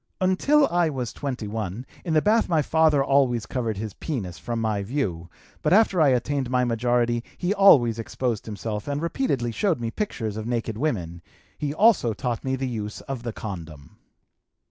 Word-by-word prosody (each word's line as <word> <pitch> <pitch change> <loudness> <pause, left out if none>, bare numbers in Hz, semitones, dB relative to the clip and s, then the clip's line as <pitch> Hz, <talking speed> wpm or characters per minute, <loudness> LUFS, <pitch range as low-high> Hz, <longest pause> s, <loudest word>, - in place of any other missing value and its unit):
Until 275 +11 +3
I 175 -1 +2
was 125 -5 -4
21, 110 -4 -4 0.2
in 165 - -2
the 155 - +4
bath 220 0 +3
my 160 -4 +2
father 155 -2 +3
always 130 -5 +2
covered 115 -4 -2
his 105 -1 -5
penis 100 - -5
from 120 -1 -3
my 110 -2 0
view, 100 - -3 0.3
but - - +2
after 200 -4 +4
I 150 - +6
attained 130 +1 0
my 125 0 +2
majority 120 0 +1
he 180 +2 0
always 130 - +5
exposed 115 0 -3
himself 105 0 -5
and 145 0 -1
repeatedly 150 - -1
showed 175 - 0
me 115 -1 -3
pictures 115 - -3
of 110 +1 -5
naked 115 -2 -2
women; 90 - -2 0.3
he 145 -1 -3
also 170 - +4
taught 120 -1 -3
me 130 0 0
the 130 0 -3
use 105 -4 -5
of 135 -3 -5
the 120 -1 -4
condom. 85 -10 -8
125 Hz, 175 wpm, -25 LUFS, 110-150 Hz, 0.3 s, I